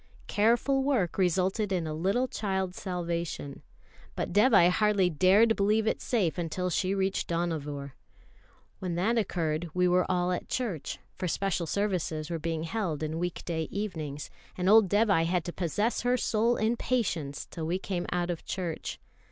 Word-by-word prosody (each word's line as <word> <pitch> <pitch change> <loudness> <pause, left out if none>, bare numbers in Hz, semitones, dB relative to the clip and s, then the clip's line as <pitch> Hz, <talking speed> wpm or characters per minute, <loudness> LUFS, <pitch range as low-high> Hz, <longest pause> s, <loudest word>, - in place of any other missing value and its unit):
Careful 235 +6 +2
work 245 - 0
resulted 190 +3 +1
in 180 -3 0
a 155 - -3
little 195 +11 +1
child's 190 -5 -2
salvation; 170 -5 -3 0.5
but - - -3
Dévai 210 -4 +6
hardly 200 -2 +2
dared 195 +8 +5
believe 210 +2 +2
it - - 0
safe 195 -9 0
until 180 +2 -2
she 185 +3 0
reached 195 0 0
Dohnavur. 150 -5 -2 0.9
When 180 -3 -3
that 220 +7 +2
occurred 170 -5 -1
we 180 0 +3
were 180 0 +3
all 180 0 +1
at 180 - -3
church; 205 - -3 0.2
for 180 - -4
special 175 -1 -1
services 175 -5 -1
were 165 - -2
being 160 0 -2
held 165 -4 -2
in 155 +1 -2
week 175 0 -3
day 160 -2 -2
evenings, 160 -8 -4 0.3
and 180 0 -1
old 210 -1 +6
Dévai 205 -5 +3
had 175 -1 0
to 175 - -4
possess 205 +7 0
her 245 +1 +2
soul 230 +1 +2
in 225 +2 +1
patience 175 - -1
till 160 -2 -4
we 175 +3 0
came 185 -2 -3
out 175 0 0
of 170 - -5
church. 175 -4 -4
180 Hz, 165 wpm, -29 LUFS, 165-210 Hz, 0.9 s, Dévai